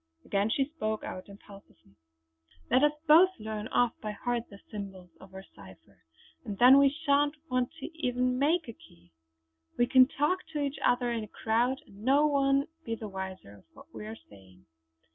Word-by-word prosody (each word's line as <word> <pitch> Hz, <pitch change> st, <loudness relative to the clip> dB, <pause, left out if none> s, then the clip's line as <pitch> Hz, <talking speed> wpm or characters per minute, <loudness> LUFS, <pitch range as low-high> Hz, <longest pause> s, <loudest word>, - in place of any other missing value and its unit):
Again 200 Hz, +1 st, 0 dB
she 270 Hz, +4 st, +1 dB
spoke 220 Hz, -8 st, -4 dB
out 185 Hz, +2 st, -7 dB
impulsively: 200 Hz, -, -16 dB, 0.8 s
"Let 260 Hz, -, +4 dB
us 295 Hz, 0 st, +4 dB
both 330 Hz, +5 st, +7 dB
learn 215 Hz, 0 st, -5 dB
off 245 Hz, -1 st, +1 dB
by 215 Hz, -1 st, -4 dB
heart 240 Hz, +2 st, -3 dB
the 200 Hz, -, -12 dB
symbols 190 Hz, -4 st, -8 dB
of 190 Hz, -, -15 dB
our 190 Hz, 0 st, -10 dB
cipher; -, -, -16 dB, 0.4 s
and 205 Hz, -5 st, -6 dB
then 255 Hz, +4 st, +8 dB
we 280 Hz, 0 st, +6 dB
shan't 290 Hz, 0 st, +1 dB, 0.2 s
want 255 Hz, -1 st, +1 dB
even 290 Hz, -5 st, -4 dB, 0.2 s
to 250 Hz, -, -2 dB
make 315 Hz, +3 st, +1 dB
a 230 Hz, -, -7 dB
key. 85 Hz, -, -21 dB, 0.7 s
We 240 Hz, -, +4 dB
can 255 Hz, +1 st, +6 dB
talk 295 Hz, +7 st, 0 dB
to 300 Hz, -, -2 dB
each 285 Hz, 0 st, -3 dB
other 245 Hz, 0 st, +2 dB
in 230 Hz, -2 st, -2 dB
a -, -, -8 dB
crowd, 235 Hz, +5 st, 0 dB
and 200 Hz, +1 st, -15 dB
no 280 Hz, +4 st, +4 dB
one 275 Hz, -1 st, +2 dB, 0.2 s
be 230 Hz, -4 st, -3 dB
the 220 Hz, -1 st, -7 dB
wiser 190 Hz, -, -7 dB
of 95 Hz, -, -21 dB
what -, -, -17 dB
we 210 Hz, -, -8 dB
are 220 Hz, +1 st, -7 dB
saying." 95 Hz, -2 st, -18 dB
240 Hz, 185 wpm, -29 LUFS, 200-280 Hz, 0.8 s, then